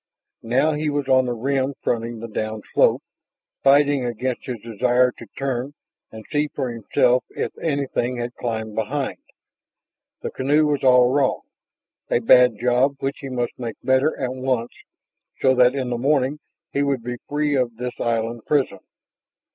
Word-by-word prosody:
Now 130 +7 +2
he 150 +1 -1
was 145 -2 -2
on 130 -1 +4
the 120 - -1
rim 135 +3 -1
fronting 115 0 -1
the 115 - -5
downslope, 110 0 0 0.6
fighting 140 0 +4
against 125 +1 -3
his 125 -3 -4
desire 125 +3 +2
to - - -13
turn 135 +1 -3 0.4
and 110 -1 -10
see 150 0 +1
for 130 -4 -4
himself 120 +2 +2
if - - -4
anything 140 -5 -1
had 120 0 -4
climbed 110 -3 -4
behind. 130 +6 -2 1.0
The - - -3
canoe 145 +4 +2
was 145 -2 0
all 125 -1 +6
wrong, 135 -1 +1 0.7
a - - +3
bad 125 -1 +5
job 125 +3 +2
which 135 +1 -3
he 135 - -7
must 120 -2 -2
make 115 -3 -4
better 130 +4 +2
at 130 -1 -2
once 130 -2 -1 0.7
so 130 - +4
that 125 +1 +4
in 130 -2 -2
the 120 - -2
morning 140 +1 +1 0.3
he 140 - 0
would 140 -4 0
be 125 0 -4
free 150 0 0
of 125 -4 0
this 125 +1 -6
island 115 0 -1
prison. 145 -3 +1
125 Hz, 160 wpm, -22 LUFS, 120-140 Hz, 1.0 s, all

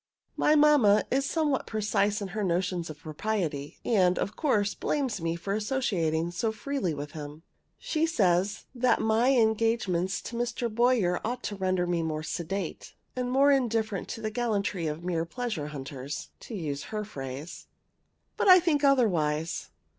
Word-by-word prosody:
My 305 - +3
mamma 290 -9 +5
is 275 +1 +1
somewhat 300 -5 0
precise 210 -1 0
in 195 - -5
her 210 +2 -3
notions 180 -1 -1
of 155 - -8
propriety, 155 -2 -3
and, 185 -6 +3
of 210 - -2
course, 210 -9 +1
blames 260 - -2
me 165 0 -1
for 185 +4 -3
associating 195 - 0
so 220 +6 -1
freely 220 -3 -2
with 145 -1 -5
him. 150 +1 -8 0.3
She 320 0 0
says 195 - +1
that 255 0 +2
my 220 +3 +3
engagements 220 -5 +1
to 235 - -6
Mr. 235 -1 -2
Boyer 230 -7 +2
ought 245 +3 -3
to 205 - -3
render 185 -2 0
me 175 -1 0
more 155 -1 -2
sedate, 175 +3 -4 0.2
and 250 -1 -2
more 275 +3 +5
indifferent 225 -6 0
to 225 - -6
the 215 -1 -2
gallantry 210 -7 -1
of 155 +2 -4
mere 170 -2 0
pleasure 185 - -4
hunters, 140 -1 -6
to 230 - -8
use 150 -6 -4
her 215 -1 -4
phrase. 140 -4 -7 0.7
But - - +1
I 370 -1 +10
think 320 -5 +1
otherwise. 170 - +2
205 Hz, 160 wpm, -28 LUFS, 170-240 Hz, 0.7 s, I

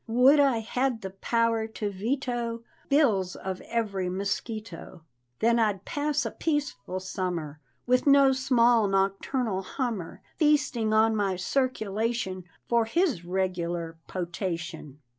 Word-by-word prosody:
Would 250 +6 +5
I 270 -5 +3
had 245 +1 -1
the 190 -1 -5
power 230 +3 0
to 215 -2 -4
veto 235 +2 -2 0.3
Bills 215 - +3
of 190 -1 -5
every 200 -5 -1
mosquito; 195 -2 -5 0.4
Then 235 +1 +4
I'd 210 -4 0
pass 295 0 -1
a - - -2
peaceful 235 - -2
summer, 180 -5 -4 0.3
With 250 +3 +2
no 275 -1 +7
small 240 -4 +3
nocturnal 195 +2 0
hummer 215 - -4
Feasting 290 -8 +2
on 220 +1 +4
my 200 -3 0
circulation, 215 -3 -1 0.2
For 235 -1 +3
his 280 - +1
regular 175 -2 -2
potation. 170 -5 -5
220 Hz, 120 wpm, -27 LUFS, 185-245 Hz, 0.4 s, no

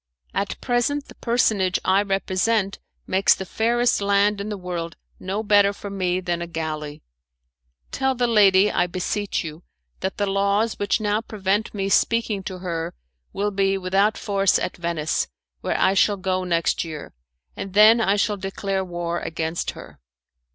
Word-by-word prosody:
At 195 0 -2
present 270 +4 0
the - - -11
personage 215 -6 +1
I 190 +2 +4
represent 195 +1 0 0.3
makes 190 +1 +3
the 190 - -6
fairest 235 +3 +1
land 200 0 +2
in 205 - -5
the 210 - -4
world 175 -3 -5 0.2
no 195 +4 -3
better 205 -1 +4
for 200 0 -8
me 185 -2 0
than 175 -2 -2
a 170 - -4
galley. 155 -3 -5 0.9
Tell 265 0 0
the 245 0 +1
lady, 205 -3 +5
I 175 - +1
beseech 185 +3 -2
you, 160 0 -8 0.4
that 190 +1 -3
the 205 - +1
laws 200 +3 +1
which 205 +3 +1
now 210 0 0
prevent 210 0 -2
me 195 -1 -1
speaking 220 0 +1
to 185 - -5
her 165 - -3 0.4
will 205 +1 -1
be 195 0 +1
without 195 +3 +1
force 195 -2 +2
at - - -3
Venice, 170 -3 -1 0.3
where - - -2
I 190 - +4
shall 200 +1 +3
go 185 -1 -1
next 170 -2 0
year, 160 -3 -8 0.4
and 195 -1 -7
then 220 +2 +7
I 200 -2 +3
shall 205 0 0
declare 195 0 -3
war 175 -1 -3
against 165 +1 -3
her. - - -12
195 Hz, 165 wpm, -23 LUFS, 180-210 Hz, 0.9 s, then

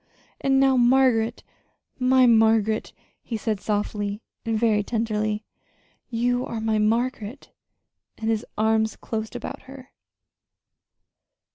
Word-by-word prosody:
And 270 0 +3
now 270 -1 +4
Margaret, 240 -2 +3 0.6
my 255 0 +4
Margaret," 220 -2 +3 0.3
he 230 - -4
said 215 -1 -2
softly 205 -1 -2 0.2
and 225 -1 -1
very 215 -2 +2
tenderly. 215 -1 -2 0.6
"You 245 +1 0
are 230 - -4
my 220 -1 0
Margaret!" 230 +3 -1 0.7
And 220 - -4
his 225 -1 0
arms 220 0 +2
closed 220 -1 -5
about - - -6
her. 265 -1 -12
225 Hz, 110 wpm, -24 LUFS, 215-245 Hz, 0.7 s, now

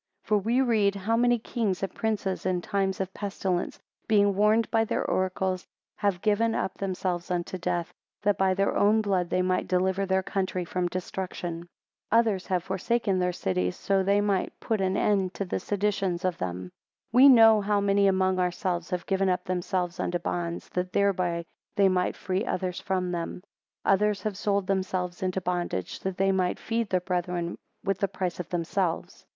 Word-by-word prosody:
18 - - -28
For 210 - +4
we 230 +6 +1
read, 215 -6 +2
How 205 +4 0
many 240 +1 +3
kings 215 -5 -2
and 195 - -2
princes, 210 -4 -2
in 185 -1 0
times 195 -1 -1
of 190 0 -3
pestilence, 195 -3 -2 0.3
being 205 -2 +4
warned 215 +3 +3
by 225 -1 +3
their 225 - -1
oracles, 185 0 -1 0.3
have 200 -4 0
given 225 +1 +2
up 190 - -1
themselves 185 -2 -2
unto 180 0 -2
death; 170 0 -2 0.3
that 205 -1 +3
by 190 -1 +2
their 195 +1 +1
own 215 +2 +4
blood, 185 -4 0
they 185 0 +1
might 185 0 0
deliver 190 +1 +1
their 190 0 +1
country 185 -2 -2
from 180 +1 -1
destruction. 180 -1 -4
19 170 +1 -9 0.4
Others 220 -5 +3
have 180 -2 0
forsaken 195 +1 0
their 180 0 +1
cities, 90 - -1
so 195 -1 +1
that 190 - -1
they 200 +1 +4
might 200 -2 -1
put 220 -3 -1
an 190 +1 +1
end 195 -3 +1
to 200 - -2
the 180 - -2
seditions 195 -2 -1
of 180 -2 -1
them. 90 0 -4 0.4
20 250 +4 +7
We - - +10
know 225 -4 +7
how 205 0 +1
many 200 0 +3
among 190 -1 +2
ourselves, 180 -1 -1
have 180 -2 -3
given 195 0 +1
up 180 - 0
themselves 180 0 -2
unto 175 - 0
bonds, 170 -1 -3
that 180 0 -3
thereby 180 -4 +1 0.3
they 195 -1 +5
might 180 -1 +1
free 190 +2 -2
others 185 -3 -2
from 185 -1 -1
them. 175 +1 -4 0.4
21 - - +4
Others 210 +1 +1
have 215 -3 -2
sold 200 -1 0
themselves 185 -2 -2
into 185 0 -1
bondage, 175 - -2
that 190 -1 -4
they 195 0 +3
might 185 -1 +1
feed 230 -1 -2
their 185 - +2
brethren 175 -1 -2 0.3
with 195 -1 -1
the 200 - +1
price 180 -2 -3
of 175 - -5
themselves. 180 +1 -2
190 Hz, 190 wpm, -27 LUFS, 180-200 Hz, 0.4 s, We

